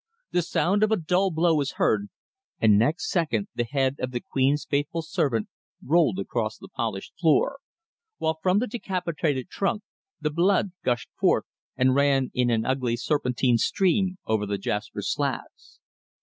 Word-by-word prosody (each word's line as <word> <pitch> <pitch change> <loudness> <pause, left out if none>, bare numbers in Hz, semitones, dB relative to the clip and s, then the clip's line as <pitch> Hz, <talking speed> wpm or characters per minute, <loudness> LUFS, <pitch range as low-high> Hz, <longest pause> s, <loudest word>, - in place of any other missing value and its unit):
The 175 - +2
sound 190 +4 +1
of 215 0 +3
a - - +5
dull 180 +4 +1
blow 165 0 +2
was 145 -3 0
heard, 105 -1 +1 0.5
and 110 -2 +5
next 155 - +1
second 125 - 0
the 120 - -1
head 135 +1 0
of 130 - -2
the 125 -1 -3
Queen's 135 +4 0
faithful 145 +3 -1
servant 150 - 0 0.4
rolled 150 - +3
across 110 +3 -2
the - - -12
polished 110 -6 -4
floor, 175 - +3 0.6
while 160 0 -1
from 185 +1 +3
the 235 - +2
decapitated 170 - -2
trunk 205 +2 -1 0.4
the 150 - -1
blood 185 +4 +2
gushed 120 -1 -1
forth - - +3 0.3
and 130 0 +4
ran 140 -1 +2
in 125 -1 +1
an 115 -1 +1
ugly 130 -3 0
serpentine 125 -3 +1
stream 190 - +1
over 110 -2 0
the 100 0 -1
jasper 105 +2 -3
slabs. - - -4
145 Hz, 160 wpm, -26 LUFS, 120-175 Hz, 0.6 s, a